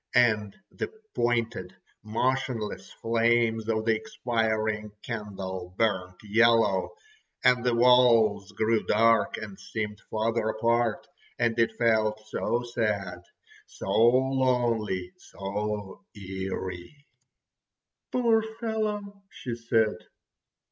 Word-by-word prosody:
And 110 -4 +3
the - - -4 0.3
pointed, 115 -6 -1 0.3
motionless 115 0 -2
flames 115 -1 +1
of 110 -1 0
the 115 -1 +3
expiring 110 - -1
candle 95 -5 -6
burnt 95 -5 0
yellow—and 115 - +1
the 125 -1 +2
walls 115 -4 +4
grew 110 +2 +1
dark 115 +1 +3
and 105 -2 -8
seemed 105 +1 -5
farther 110 +1 0
apart—and 115 0 -1
it 115 - +1
felt 110 -2 +2
so 120 +2 -1
sad, 100 -7 -2 0.5
so 95 - -6
lonely, 120 -5 +2
so 105 0 -5
eery. 95 +6 -6 1.1
"Poor 235 -3 +3
fellow!" 215 -2 -4
she 125 - -6
said. 115 -2 +1
115 Hz, 90 wpm, -27 LUFS, 105-120 Hz, 1.1 s, walls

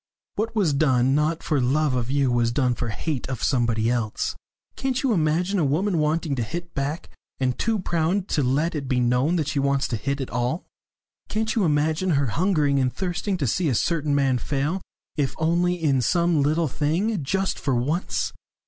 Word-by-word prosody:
"What 225 +2 -2
was 185 -9 +2
done, 135 -3 +3
not 155 +3 +1
for 150 -4 +1
love 140 +3 +2
of 125 -1 -1
you, 135 -2 +2
was 120 -1 +2
done 125 0 +1
for 120 0 -3
hate 135 +4 -3
of 130 -4 -4
somebody 115 -4 +1
else! 115 -3 -1 0.4
Can't 265 0 -1
you 260 -4 +2
imagine 175 +3 +1
a - - +2
woman 165 +6 +1
wanting 155 0 0
to - - 0
hit 170 +8 -5
back, 140 +4 -3 0.3
and 130 -2 +1
too 225 -1 0
proud 180 +1 0
to 150 - +1
let 140 +6 +1
it 145 -4 -4
be 130 -1 +1
known 125 +7 +2
that 155 -5 0
she 145 - -1
wants 140 0 +1
to 115 - -1
hit 140 +7 -2
at 135 - -4
all? 125 +7 -1 0.6
Can't 220 +1 -1
you 215 -5 +2
imagine 155 +4 +1
her 140 - +2
hungering 150 -6 +2
and 130 -1 +1
thirsting 185 +3 -2
to 150 - -1
see 160 +7 +1
a 125 - +1
certain 150 +1 +1
man 135 -3 +2
fail, 150 +9 -1 0.4
if 140 -3 0
only 170 +2 +2
in 145 -7 +1
some 170 +3 +2
little 155 +3 +2
thing, 160 - -1
just 190 +7 -1
for 135 -3 0
once? 145 +9 -1
150 Hz, 195 wpm, -24 LUFS, 130-175 Hz, 0.6 s, done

